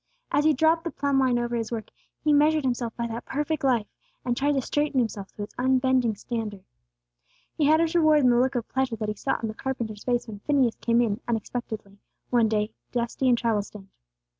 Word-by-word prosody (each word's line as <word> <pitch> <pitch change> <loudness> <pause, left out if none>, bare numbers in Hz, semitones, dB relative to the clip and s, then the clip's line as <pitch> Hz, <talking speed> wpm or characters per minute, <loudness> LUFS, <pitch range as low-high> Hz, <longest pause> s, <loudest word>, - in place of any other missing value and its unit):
As 295 - +2
he 310 - +5
dropped 320 +4 +3
the 335 - -2
plumb 280 -3 0
line 255 -2 +3
over 240 0 -1
his 230 -1 -3
work, 225 -2 -5 0.3
he 305 -1 +3
measured 300 +1 +4
himself 245 -2 -1
by 235 - -1
that 230 0 -5
perfect 295 +2 -2
life, 245 -5 +2 0.4
and 245 -1 0
tried 285 +3 +1
to 270 - +1
straighten 295 0 -1
himself 215 -5 -1
to 205 - -6
its 205 - -9
unbending 255 -3 +2
standard. 210 -3 -5 0.9
He 300 - +1
had 310 +2 +5
his 330 0 +1
reward 310 -3 +5
in 250 -2 +5
the 240 - +4
look 255 +1 +1
of 235 -2 -2
pleasure 260 -3 -1
that 215 -1 -3
he - - -1
saw 270 - -1
on 225 - -2
the 215 - -5
carpenter's 225 -4 -4
face 245 -1 0
when 210 -2 -8
Phineas 265 -1 +1
came 235 0 +2
in, 215 -3 0
unexpectedly, 220 -3 -4 0.3
one 235 -2 +4
day, 215 0 -1 0.2
dusty 240 +2 0
and 240 - +4
travel 225 -3 +1
stained. 200 -1 -12
245 Hz, 215 wpm, -26 LUFS, 225-275 Hz, 0.9 s, he